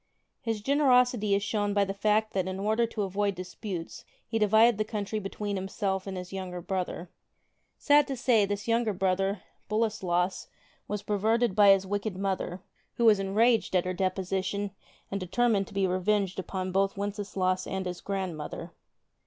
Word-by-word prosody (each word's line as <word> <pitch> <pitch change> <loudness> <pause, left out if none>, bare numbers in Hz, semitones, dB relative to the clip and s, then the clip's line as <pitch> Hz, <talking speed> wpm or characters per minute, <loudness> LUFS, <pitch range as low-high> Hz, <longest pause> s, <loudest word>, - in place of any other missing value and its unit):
His 225 -2 -2
generosity 250 -5 +3
is 200 - 0
shown 205 -1 -1
by 200 -1 +4
the 195 - -3
fact 215 +2 +1
that 185 -2 0
in 190 0 -4
order 220 +3 +1
to 215 -2 -3
avoid 200 +1 -1
disputes 180 -1 -6 0.2
he 225 -1 -1
divided 220 +1 +5
the - - +3
country 215 0 -3
between 205 +1 -4
himself 190 0 -2
and 190 -1 -4
his 180 +1 -7
younger 185 -2 -5
brother. 180 -1 -4 0.7
Sad 290 -1 +4
to 270 - -3
say, 240 -4 +3
this 205 +1 -3
younger 230 -2 +2
brother, 195 +1 0 0.3
Boleslas, 195 -5 0 0.4
was 205 0 -3
perverted 220 +1 +1
by 205 -1 +7
his 195 -1 +5
wicked 205 0 -3
mother, 190 -2 -2 0.3
who 235 - +1
was 215 -3 +6
enraged 215 +3 +2
at 180 - +3
her 185 - -1
deposition 190 +2 -1 0.4
and 200 - -1
determined 200 +2 +1
to - - -13
be 195 -1 +2
revenged 190 +1 0
upon 185 0 -3
both 195 +1 +1
Wenceslaus 200 -2 -1
and 190 0 -3
his 180 -1 -5
grandmother. 185 -6 -4
200 Hz, 165 wpm, -28 LUFS, 190-215 Hz, 0.7 s, by